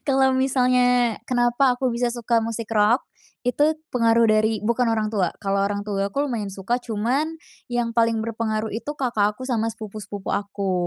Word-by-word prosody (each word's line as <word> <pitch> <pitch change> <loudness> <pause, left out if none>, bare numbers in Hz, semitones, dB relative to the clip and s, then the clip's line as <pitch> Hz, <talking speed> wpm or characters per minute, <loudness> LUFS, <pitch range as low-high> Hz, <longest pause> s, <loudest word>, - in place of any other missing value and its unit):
Kalau 265 -1 +4
misalnya 250 -3 +3
kenapa 245 +1 +2
aku 255 0 0
bisa 240 +1 0
suka 235 -1 +1
musik 225 -1 -4
rock, 215 +3 +3 0.4
itu 295 +5 +2 0.2
pengaruh 230 -1 +4
dari 215 0 +2
bukan 235 +2 +1
orang 220 -1 0
tua, 190 -5 +1
kalau 195 -1 0
orang 200 0 -1
tua 200 -1 -1
aku 275 - -5
lumayan 220 -7 -3
suka 200 +6 -2
cuman 255 +9 -1 0.3
yang 240 -1 -1
paling 230 -1 +2
berpengaruh 220 -1 -2
itu 235 +6 -4
kakak 210 -5 +1
aku 255 - -6
sama 225 -3 0
sepupu-sepupu 210 -2 -7
aku. 200 -1 -2
230 Hz, 165 wpm, -23 LUFS, 215-245 Hz, 0.4 s, Kalau